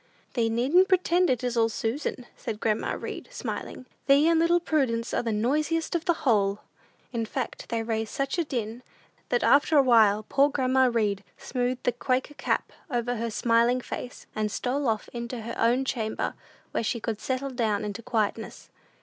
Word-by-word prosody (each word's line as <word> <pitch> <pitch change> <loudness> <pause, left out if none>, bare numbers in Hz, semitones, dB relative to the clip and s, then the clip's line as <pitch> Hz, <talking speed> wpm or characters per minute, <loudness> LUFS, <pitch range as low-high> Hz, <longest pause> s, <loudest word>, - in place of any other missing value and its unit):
"Thee 230 -3 +1
needn't 270 +12 +4
pretend 365 -1 +3
it 250 -1 0
is 245 -1 -1
all 225 -1 +3
Susan," 240 +3 -3
said 220 -3 -5
grandma 215 -1 0
Read, - - -6
smiling. 375 - -5 0.2
"Thee 285 +3 +6
and 330 -1 +4
little 340 +1 +4
Prudence 260 -9 0
are - - +1
the 230 - -2
noisiest 300 +9 0
of 340 -1 -1
the 345 - +4
whole!" 205 -4 +2 0.5
In 230 -1 -1
fact, 245 +3 -5
they 230 -1 -1
raised 220 -1 -2
such 275 +5 -1
a - - +3
din, 240 -5 -4 0.5
that 245 - +1
after 290 +2 +5
a 280 - +7
while 215 -4 +5
poor 280 +1 +4
grandma 260 -2 +3
Read 205 -4 0
smoothed 250 0 -2
the 245 - +2
Quaker 255 +3 -1
cap - - -1 0.2
over 245 -2 -1
her 230 +1 -2
smiling 235 +2 +2
face, 250 0 -7
and 215 -1 -1
stole 265 +5 -1
off 220 -2 0
into 235 0 -5
her 230 +1 -5
own 245 +4 +2
chamber, 225 -4 -2 0.4
where - - 0
she 235 +2 -1
could 220 -1 -4
"settle 265 +1 -2
down 220 -4 0
into 210 +2 -5
quietness." 220 -2 -2
245 Hz, 180 wpm, -27 LUFS, 225-275 Hz, 0.5 s, a